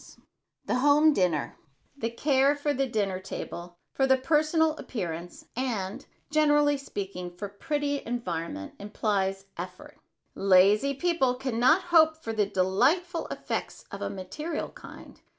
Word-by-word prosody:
[Sidenote: - - -18 0.4
THE - - 0
HOME 295 +3 +5
DINNER] 175 - 0 0.4
The 230 -5 -2
care 275 +3 +2
for 290 0 -1
the 270 0 0
dinner 200 -5 -1
table, 175 -2 -7 0.2
for 270 - +2
the 265 0 +5
personal 310 +3 +2
appearance 175 -6 -6
and, 235 -2 -3 0.2
generally 295 -1 +4
speaking, 190 -9 -6
for 205 - -4
pretty 285 +7 -2
environment 170 - -4
implies 195 -2 -1
effort. 180 +1 -8 0.3
Lazy 200 +8 +4
people 275 -5 +1
can 255 -3 -3
not 310 +10 +5
hope 315 -1 +6
for 225 -8 -5
these 210 -2 0
delightful 265 - +1
effects - - -5
of - - -7
a - - -2
material 295 - -5
kind. - - -13
245 Hz, 135 wpm, -28 LUFS, 190-290 Hz, 0.4 s, hope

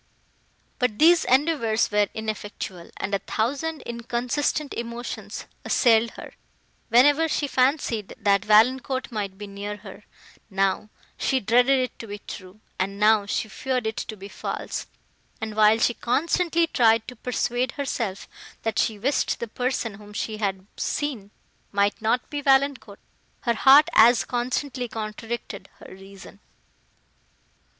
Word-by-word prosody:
But, 250 -4 0
these 335 +4 +5
endeavours 255 -5 +2
were 210 0 +3
ineffectual, 205 -4 -5
and 200 - -4
a 200 - +2
thousand 275 - -2
inconsistent 245 +5 -2
emotions 235 +1 -6 0.2
assailed 230 -2 +3
her, - - -9 0.6
whenever 290 +7 +5
she 295 - 0
fancied 255 -6 0
that 200 -1 +2
Valancourt 255 +5 +3
might 200 -4 -4
be 205 - -7
near 205 +1 -6
her; - - -12 0.5
now, 195 +1 0 0.3
she 265 - +1
dreaded 245 +5 +4
it 255 -1 -2
to 230 - -8
be 205 0 -6
true, 195 0 -11 0.2
and 195 +2 -2
now 210 -1 +4
she 220 - -1
feared 250 +3 -2
it 220 -1 -2
to 215 -1 -5
be 195 +1 -9
false; - - -5 0.5
and, 220 -1 -5
while 215 0 +5
she 240 +1 +2
constantly 335 +7 +1
tried 225 -7 +3
to 250 - -8
persuade 245 +1 -1
herself, 235 -8 -3 0.4
that 225 -1 -1
she 220 - +1
wished 260 +7 0
the 235 - -4
person, 245 -1 -2
whom 205 +1 -13
she 215 0 -3
had 195 -3 -2
seen, 260 -9 -3 0.4
might 200 +1 +1
not 230 +3 0
be 290 -1 -3
Valancourt, 270 -6 +2 0.4
her 235 - +1
heart 275 +6 +7
as 235 -1 +6
constantly 250 +1 -2
contradicted 220 -2 -6
her - - -12
reason. 195 - -13
230 Hz, 140 wpm, -24 LUFS, 210-260 Hz, 0.6 s, heart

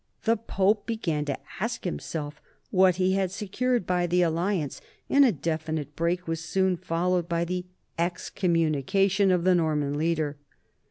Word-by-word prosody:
The 230 0 +3
Pope 205 -1 0
began 165 -10 -1
to 140 -2 -2 0.2
ask - - -2
himself 145 - -4 0.3
what 185 -2 +5
he 185 0 +2
had 190 -1 +1
secured 215 +4 -1
by 180 -1 +1
the 180 +1 +3
alliance, 170 -2 -1 0.3
and 280 +1 +7
a 255 - +5
definite 155 -3 -3
break 175 +2 -1
was 165 0 -2
soon 190 +2 +1
followed 175 0 -1
by 170 0 0
the 180 +1 -3 0.3
excommunication 180 +2 +1
of 180 -2 +2
the 185 0 +4
Norman 150 -4 +1
leader. 155 -2 0
175 Hz, 150 wpm, -27 LUFS, 160-190 Hz, 0.3 s, and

